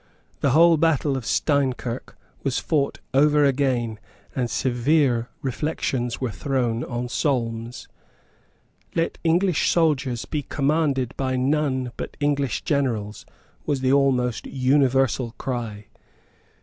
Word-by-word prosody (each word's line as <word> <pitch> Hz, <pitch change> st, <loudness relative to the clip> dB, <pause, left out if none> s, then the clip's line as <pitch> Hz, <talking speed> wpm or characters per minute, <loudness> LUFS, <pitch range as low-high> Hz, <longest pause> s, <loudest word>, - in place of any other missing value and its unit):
The 140 Hz, -, +2 dB
whole 165 Hz, +4 st, +6 dB
battle 150 Hz, -3 st, +2 dB
of 125 Hz, -5 st, -4 dB
Steinkirk 130 Hz, -4 st, -1 dB, 0.2 s
was 135 Hz, -3 st, -1 dB
fought 145 Hz, -4 st, 0 dB, 0.2 s
over 150 Hz, +2 st, +4 dB
again; 125 Hz, -5 st, 0 dB, 0.4 s
and 125 Hz, -3 st, -1 dB
severe 125 Hz, -1 st, +1 dB
reflections 130 Hz, -3 st, -2 dB
were 130 Hz, -3 st, -2 dB
thrown 120 Hz, 0 st, -1 dB
on 120 Hz, 0 st, -4 dB
Solmes. 120 Hz, -3 st, -2 dB, 1.1 s
"Let 165 Hz, 0 st, -1 dB
English 175 Hz, +1 st, +2 dB
soldiers 140 Hz, -8 st, +1 dB
be 150 Hz, -, -2 dB
commanded 140 Hz, -2 st, 0 dB
by 130 Hz, -1 st, -1 dB
none 130 Hz, -1 st, 0 dB
but -, -, -6 dB
English 145 Hz, -4 st, 0 dB
generals," 115 Hz, -8 st, -1 dB, 0.4 s
was 145 Hz, -3 st, 0 dB
the 130 Hz, 0 st, +2 dB
almost 130 Hz, -4 st, +1 dB
universal 130 Hz, -2 st, +1 dB
cry. 115 Hz, -5 st, -4 dB
135 Hz, 110 wpm, -23 LUFS, 120-145 Hz, 1.1 s, whole